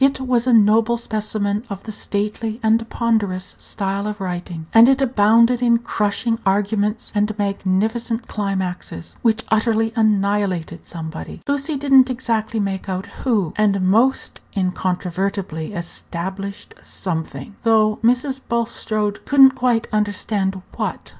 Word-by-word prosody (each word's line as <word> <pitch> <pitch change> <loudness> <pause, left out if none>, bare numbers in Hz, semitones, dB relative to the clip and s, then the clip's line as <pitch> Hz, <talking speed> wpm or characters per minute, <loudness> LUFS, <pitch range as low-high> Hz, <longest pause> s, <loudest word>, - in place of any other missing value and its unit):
It 270 - -8
was 250 -2 0
a - - +4
noble 225 +1 +4
specimen 215 -2 -2
of 200 -1 -6
the 220 - -6
stately 215 +2 -3
and 225 +1 +2
ponderous 205 -6 -1
style 195 +1 -3
of 210 0 -5
writing, 175 -3 -5
and 230 +2 +8
it 270 0 +3
abounded 235 -1 +4
in 235 -1 +4
crushing 225 0 -1
arguments 205 +2 0
and 210 0 0
magnificent 210 +4 -1
climaxes, 190 - -4
which 225 -1 +2
utterly 225 0 +1
annihilated 200 -6 0
somebody 160 -1 -7
(Lucy 285 +1 -1
did 275 0 -1
n't 260 -1 +7
exactly 230 -3 -1
make 195 -1 -3
out 185 0 -3 0.2
who), 210 - +1
and 205 -2 +2
most 225 +8 +2 0.2
incontrovertibly 185 -1 -2
established 190 +2 -6
something, 160 -2 -5
though 215 -2 +3
Mrs. 260 +3 +2
Bulstrode 215 -3 -1
could 285 - +1
n't 265 -1 +9
quite 240 -3 +1
understand 205 -2 -1 0.2
what. - - -3
210 Hz, 130 wpm, -20 LUFS, 195-230 Hz, 0.2 s, n't